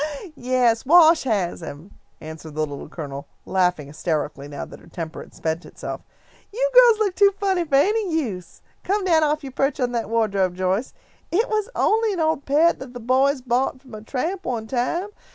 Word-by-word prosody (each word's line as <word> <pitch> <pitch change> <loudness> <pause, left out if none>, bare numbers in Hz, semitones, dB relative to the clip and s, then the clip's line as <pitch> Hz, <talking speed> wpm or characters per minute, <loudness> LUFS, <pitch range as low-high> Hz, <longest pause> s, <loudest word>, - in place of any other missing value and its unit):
"Yes, 245 -3 +1
Wash 320 +1 +6
has 200 -8 -1
him," 160 +4 -9 0.3
answered 160 -1 -9
the 155 0 0
Little 145 0 -8
Colonel, 140 -4 -7 0.2
laughing 180 -5 +1
hysterically 150 -1 -3
now 145 -1 -6
that - - -13
her - - -18
temper 165 -1 -6
had - - -14
spent 160 +2 -2
itself. - - -7 0.5
"You - - 0
girls - - +7
look 415 -3 0
too 400 +1 +5
funny 380 -4 +1
for 290 -3 0
any 405 +6 +2
use. 215 - -4 0.2
Come 400 +1 0
down 330 -3 +4
off 305 0 0
your 270 - -7
perch 275 +1 0
on 250 -2 0
that 230 -3 -2
wardrobe, 200 -5 +1
Joyce. 185 +6 -1 0.4
It 435 +7 +2
was 430 0 -1
only 440 0 +2
an 365 - -4
old 315 -3 0
pet 310 +5 +3
that 260 -2 -9
the - - -5
boys 260 +3 +2
bought 255 +1 0
from 260 -4 -16
a 215 - -7
tramp 320 - -3
one 235 -6 -3
time. 265 - -1
255 Hz, 190 wpm, -23 LUFS, -, 0.5 s, girls